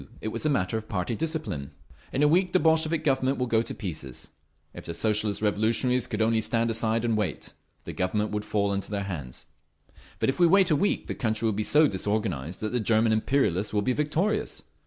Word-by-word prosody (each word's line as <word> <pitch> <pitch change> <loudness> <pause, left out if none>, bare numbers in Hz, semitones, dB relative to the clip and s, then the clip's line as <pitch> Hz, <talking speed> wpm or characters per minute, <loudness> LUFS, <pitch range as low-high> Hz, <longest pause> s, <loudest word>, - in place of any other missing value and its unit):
It 110 - -3
was 115 +7 -3
a - - +2
matter 110 -5 0
of 110 - -14
party 100 +3 -2
discipline…. 125 - -3 0.4
"In 135 - +1
a - - +6
week 180 +3 +2
the 185 - +5
Bolshevik 160 -1 +2
Government 135 -1 +1
will 125 - 0
go 115 -2 +2
to - - -6
pieces; 75 - -6 0.4
if - - -9
the 85 - -4
Socialist 105 +2 0
Revolutionaries 115 +4 +1
could 110 0 -1
only 110 0 +2
stand 115 +1 0
aside 115 +1 0
and 115 -2 +1
wait, 100 -10 -3 0.3
the - - -7
Government 105 +3 -1
would 105 0 -2
fall 100 -1 0
into 100 0 -3
their 100 -1 -2
hands. 75 -11 -6 0.7
But - - +1
if 135 - -2
we 175 - +6
wait 190 0 +4
a - - +5
week 200 +8 0
the - - -4
country 110 -2 -1
will 110 - +2
be 105 - -2
so 150 +8 +4
disorganised 95 - -2
that 110 - -2
the 125 - 0
German 110 0 +2
imperialists 110 -4 +1
will 105 -1 +1
be 125 - +1
victorious. 155 - -1
110 Hz, 215 wpm, -27 LUFS, 100-135 Hz, 0.7 s, a